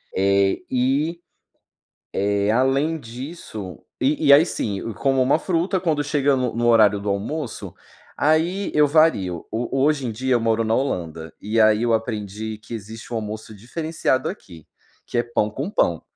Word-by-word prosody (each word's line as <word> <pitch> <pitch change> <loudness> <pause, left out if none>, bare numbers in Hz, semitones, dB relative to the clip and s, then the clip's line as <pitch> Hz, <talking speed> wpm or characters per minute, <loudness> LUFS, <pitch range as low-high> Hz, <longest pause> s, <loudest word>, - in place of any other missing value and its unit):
Eh 100 0 +2
e, 140 +7 +1 0.9
eh, 100 +1 +1
além 135 +6 +1
disso, 115 - -8 0.2
e 150 +3 +1
e - - +9
aí 150 +4 +8
sim, 100 - -3
como 135 +4 +1
uma 140 +5 +3
fruta 180 +2 0
quando 160 -5 0
chega 140 -1 +2
no 125 -3 -1
no 120 0 0
horário 105 -3 +5
do 105 - -5
almoço, 115 +7 -4 0.4
aí 165 +6 +1
eu 150 0 +5
vario. 140 - +2
O 120 +4 -2
hoje 150 -3 +1
em 115 - -3
dia 130 +3 0
eu 120 - +2
moro 115 0 +1
na 110 0 +1
Holanda, 85 - -3
e 110 +3 -2
aí 110 +1 +4
eu 120 -1 +2
aprendi 110 -1 -3
que 110 - -9
existe 110 +2 -9
um - - -1
almoço 110 0 -6
diferenciado 130 - -2
aqui, 85 -4 -10 0.4
que - - -5
é - - +3
pão 120 -3 0
com 140 - -4
pão. 85 - +1
120 Hz, 165 wpm, -22 LUFS, 105-145 Hz, 0.9 s, e